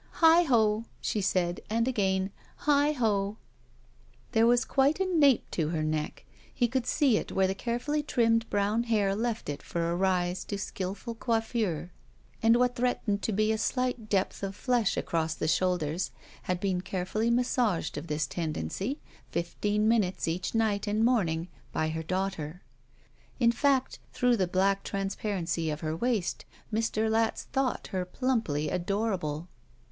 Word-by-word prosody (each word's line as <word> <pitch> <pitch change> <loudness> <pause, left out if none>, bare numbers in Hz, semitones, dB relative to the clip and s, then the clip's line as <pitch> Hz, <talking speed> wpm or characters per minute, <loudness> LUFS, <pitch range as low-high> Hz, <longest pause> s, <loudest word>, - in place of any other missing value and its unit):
"Heigh 330 +1 +6
ho!" 220 -4 +3
she 210 - -1
said, 180 -2 0
and 230 +2 +1
again, 190 -5 +1 0.3
"Heigh 290 0 +4
ho!" 210 -5 0 0.9
There 225 0 +4
was 245 +1 +4
quite 275 +5 +2
a 380 - +2
nape 300 -9 +4
to 155 -3 0
her 160 -2 -1
neck. 155 0 -2 0.3
He 240 - +1
could 250 0 -1
see 265 -7 +3
it - - -4
where 190 - +2
the 190 - +1
carefully 245 +9 -1
trimmed 230 -5 +2
brown 205 +3 +1
hair 205 -4 +2
left 230 +1 -2
it 145 - -4
for 170 0 -2
a - - 0
rise 180 -1 +1
to 200 - -3
skillful 200 +4 -4
coiffure, 225 -7 -1 0.5
and 225 +1 +5
what 245 0 +2
threatened 235 -4 0
to - - -1
be 215 +2 +2
a 220 - 0
slight 250 -2 -1
depth 195 -2 0
of 195 -1 -3
flesh 240 -3 +1
across 160 -1 -1
the - - -2
shoulders 175 0 +1 0.4
had 180 -1 +1
been 185 -2 0
carefully 190 +5 -1
massaged 235 -7 +1
of 150 +3 -5
this 155 -1 0
tendency, 165 - -3 0.3
fifteen 205 +5 0
minutes 210 -6 +1
each 175 +6 -2
night 215 -2 +1
and 215 +2 +2
morning, 175 -9 +1 0.2
by 155 - 0
her 160 +1 -3
daughter. 180 -2 -3 0.8
In 235 -2 +5
fact, 265 +1 +1
through 245 -1 +3
the 185 -3 +1
black 195 +2 +1
transparency 195 -4 -2
of 150 0 -3
her 155 0 -2
waist 225 -1 -1 0.3
Mr. 220 0 +1
Latz 225 0 +1
thought 265 -2 -2
her 185 -1 -1
plumply 180 - -1
adocable. 180 -4 -1
205 Hz, 155 wpm, -29 LUFS, 180-235 Hz, 0.9 s, Heigh